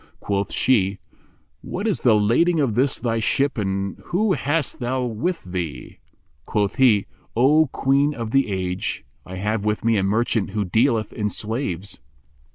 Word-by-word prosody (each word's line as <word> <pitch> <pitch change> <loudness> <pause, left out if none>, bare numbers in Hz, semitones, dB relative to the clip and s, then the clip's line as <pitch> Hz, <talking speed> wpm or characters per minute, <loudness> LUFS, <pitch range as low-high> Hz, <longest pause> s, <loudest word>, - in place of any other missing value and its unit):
Quoth 100 0 -2
she, 100 -6 +2 0.6
"What 195 +4 -5
is 215 -5 0
the 120 -4 +5
lading 125 +12 +3
of 135 -7 +1
this 130 +4 +2
thy 115 -2 -1
ship 135 +5 +1
and 100 -2 -2
whom 195 +3 +1
hast 145 -3 -1
thou 130 +1 -1
with 125 +10 -2
thee?"" 90 -5 -6 0.5
Quoth 105 -2 0
he, 115 -7 +4 0.3
"O 145 +6 +4
Queen 140 +3 +1
of 115 -2 -5
the 135 -3 +2
Age, 90 -4 -3 0.2
I 95 - -7
have 105 +2 -1
with 105 +1 -1
me 115 -1 +3
a 95 - +1
merchant 110 +1 0
who 105 - +1
dealeth 110 +2 +1
in 105 -1 -1
slaves." 105 - -4
115 Hz, 160 wpm, -22 LUFS, 100-135 Hz, 0.6 s, the